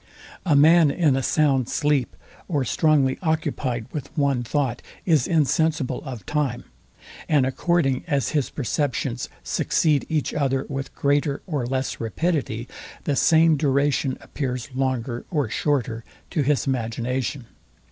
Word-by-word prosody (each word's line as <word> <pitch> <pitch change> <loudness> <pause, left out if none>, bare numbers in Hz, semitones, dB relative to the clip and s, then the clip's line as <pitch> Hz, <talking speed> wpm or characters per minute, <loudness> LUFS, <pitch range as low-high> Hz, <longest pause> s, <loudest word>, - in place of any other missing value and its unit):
A 155 - +4
man 160 +2 +6
in 150 -2 +2
a 135 - 0
sound 135 -2 +2
sleep, 145 -4 0 0.3
or 145 -7 0
strongly 140 -1 +2
occupyed 145 -8 -1
with 145 -5 -5
one 140 -4 +2
thought, 125 0 -1 0.2
is 155 -8 +3
insensible 155 -3 +1
of 125 -7 -7
time; 140 -5 -1 0.7
and 145 -4 +4
according 135 -1 +1
as 140 -4 0
his 145 -4 0
perceptions 130 -2 -2
succeed 150 -4 +1
each 155 -3 -1
other 135 -2 0
with 135 -1 -5
greater 145 0 +1
or 145 -9 -2
less 130 +1 -2
rapidity, 120 - -2 0.4
the 145 - 0
same 160 +2 +4
duration 140 -1 +1
appears 125 -3 -4
longer 130 -2 -2
or 145 -9 -1
shorter 125 -6 -1 0.3
to 155 - +1
his 145 0 +1
imagination. 125 +1 -2
140 Hz, 130 wpm, -23 LUFS, 130-150 Hz, 0.7 s, man